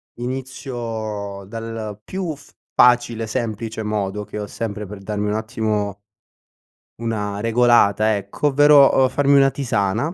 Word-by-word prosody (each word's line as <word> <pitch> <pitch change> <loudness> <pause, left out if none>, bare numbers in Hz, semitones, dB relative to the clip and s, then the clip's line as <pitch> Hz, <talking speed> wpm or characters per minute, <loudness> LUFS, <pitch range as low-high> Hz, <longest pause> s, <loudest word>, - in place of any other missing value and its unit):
inizio 115 -6 -5
dal 115 -1 -6
più 185 -5 -4
f 140 - -18 0.2
facile 120 -2 +4
e - - -4
semplice 110 -1 -3
modo 105 -1 -2
che - - -8
ho 105 - -4
sempre 105 -1 -5
per 105 +2 -9
darmi 105 +1 -3
un 105 - -1
attimo 110 -2 -2 1.0
una 105 -3 -3
regolata 115 -2 +3
ecco, 100 +9 -2
ovvero, 145 0 +6
uhm, 130 - +3
farmi 140 0 +3
una 135 0 +6
tisana. 120 - -1
110 Hz, 135 wpm, -21 LUFS, 105-125 Hz, 1.0 s, ovvero